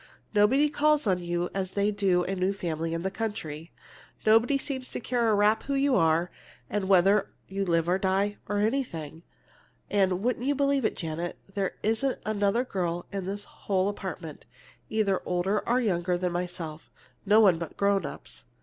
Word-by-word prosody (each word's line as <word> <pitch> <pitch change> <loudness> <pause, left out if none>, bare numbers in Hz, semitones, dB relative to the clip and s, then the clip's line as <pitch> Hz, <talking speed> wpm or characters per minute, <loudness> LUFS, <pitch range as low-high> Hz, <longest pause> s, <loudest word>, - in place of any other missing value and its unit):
Nobody 235 +8 +4
calls 300 0 +2
on 185 -3 +2
you 175 0 -2
as 190 -1 -3
they 200 +1 +1
do 195 -3 +2
on - - -5
a 195 - -1
new 185 +1 0
family 165 -3 -3
in 165 - -3
the 190 - -1
country. 185 -8 -5 0.5
Nobody 225 +5 +5
seems 265 -2 -4
to - - -4
care 240 -1 0
a 215 - +4
rap 210 +2 +3
who 280 - -1
you 275 -1 +3
are, 165 0 +2 0.4
or 210 - +1
whether 195 +1 +4 0.2
you 195 +1 -2
live 170 -3 +1
or 180 +2 +2
die, 195 +2 +1
or 205 - 0
anything. 205 - -2 0.7
And 190 -2 +2
would 245 0 0
you 285 +2 +1
believe 280 -2 +1
it, - - 0
Janet, 165 +1 -4 0.2
there 195 -2 -1
isn't 225 +5 +1
another 215 +2 +1
girl 175 -6 -2
in 195 -2 -3
this 200 +1 -4
whole 190 -1 -1
apartment, 185 -6 -7 0.4
either 205 -4 +1
older 180 +4 0
or 245 +2 +3
younger 180 -6 0
than 180 0 -1
myself! 175 -3 -5 0.3
No 210 +1 +5
one 190 -7 +5
but 170 - -7
grown 200 -2 +2
ups. - - -8
195 Hz, 180 wpm, -28 LUFS, 175-220 Hz, 0.7 s, Nobody